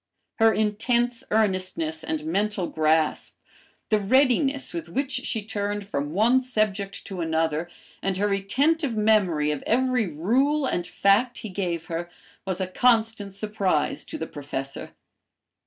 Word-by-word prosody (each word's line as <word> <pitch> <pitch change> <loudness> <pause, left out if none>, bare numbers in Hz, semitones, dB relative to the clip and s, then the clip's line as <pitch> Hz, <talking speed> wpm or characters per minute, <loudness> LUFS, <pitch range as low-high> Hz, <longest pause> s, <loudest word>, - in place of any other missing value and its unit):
Her 225 0 +6
intense 235 +4 0
earnestness 185 -7 0
and 155 -1 -3
mental 195 +3 0
grasp, 155 -1 +1 0.5
the 215 - +3
readiness 270 - +2
with 165 -1 -5
which 270 +8 -2
she 250 -4 -2
turned 205 -1 -3
from 145 -7 -2
one 230 +8 +4
subject 215 -5 -2
to 190 -3 -5
another, 160 0 0 0.3
and 195 -1 -1
her 205 +2 +1
retentive 245 +8 +1
memory 190 -9 +3
of 150 - -3
every 250 -2 +2
rule 255 - +1
and 175 -8 -1
fact 210 +5 +2
he - - -4
gave 175 -4 -3
her, 170 +1 -4 0.4
was 190 -1 -2
a 190 - 0
constant 220 -1 +1
surprise 200 -6 -1
to - - -6
the 160 - -3
Professor. 140 -3 -6
200 Hz, 140 wpm, -25 LUFS, 170-230 Hz, 0.5 s, Her